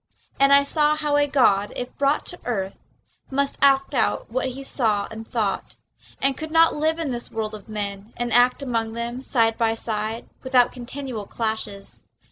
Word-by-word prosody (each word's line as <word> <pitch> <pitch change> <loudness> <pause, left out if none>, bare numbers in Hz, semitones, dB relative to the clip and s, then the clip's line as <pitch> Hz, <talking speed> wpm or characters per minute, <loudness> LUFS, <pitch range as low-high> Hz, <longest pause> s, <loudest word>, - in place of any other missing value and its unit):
And 275 0 +5
I 280 0 +7
saw 300 +1 +2
how 300 -1 0
a 290 0 +3
god, 205 -8 +3
if 245 - -5
brought 285 +1 +2
to 355 - -5
earth, 195 -5 -2 0.6
Must 280 +1 0
act 275 0 +4
out 225 -2 0
what 255 +2 0
he 265 +2 -7
saw 220 -7 +1
and 220 0 -8
thought, 220 -4 -2 0.4
And 275 0 +2
could 315 +2 -6
not 325 +1 +5
live 315 +2 +1
in 320 -5 -2
this 240 -1 -4
world 220 -1 -3
of 215 +1 -10
men 205 0 -5
And 240 -1 -2
act 245 +3 +4
among 230 -4 -1
them 235 +2 -4
side 225 -4 +1
by 225 -1 +2
side 220 0 -3
Without 255 -2 +3
continual 250 -3 -6
clashes. 220 -3 -4
245 Hz, 180 wpm, -23 LUFS, 220-275 Hz, 0.6 s, I